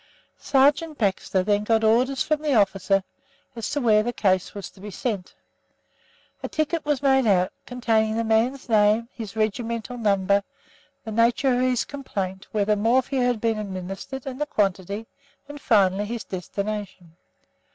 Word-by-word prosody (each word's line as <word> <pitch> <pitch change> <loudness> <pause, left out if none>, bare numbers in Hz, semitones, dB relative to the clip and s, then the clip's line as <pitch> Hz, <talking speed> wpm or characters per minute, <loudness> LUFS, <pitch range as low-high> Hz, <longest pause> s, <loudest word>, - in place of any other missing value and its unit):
Sergeant 290 +3 +2
Baxter 190 -2 0
then 205 +1 +1
got 225 +1 +2
orders 250 +5 +3
from 305 -1 0
the 295 -3 +1
officer 195 -2 +2 0.5
as 230 - -4
to 290 - -1
where 220 -5 +4
the 240 +3 -2
case 190 -5 0
was 200 - -7
to - - -20
be 210 - -7
sent. 205 -2 -4 1.1
A - - -4
ticket 310 +1 -1
was 295 -2 -1
made 265 -3 +4
out, 185 -3 +2
containing 225 -3 +1
the 230 - +1
man's 230 +4 +1
name, 215 +1 +3
his 220 -3 -8
regimental 230 +2 -2
number, 200 -2 +2 0.6
the 220 - -6
nature 235 +4 +2
of 245 - +1
his 255 -1 +1
complaint, 195 -9 -5
whether 210 0 +1
morphia 250 +5 +1
had 245 -2 +1
been 225 -1 0
administered 195 +6 -6
and 265 +1 -6
the 295 - 0
quantity, 200 -1 -1 0.4
and 290 0 -9
finally 200 -3 +3
his 230 +2 -5
destination. 190 -2 -5
220 Hz, 155 wpm, -24 LUFS, 200-250 Hz, 1.1 s, where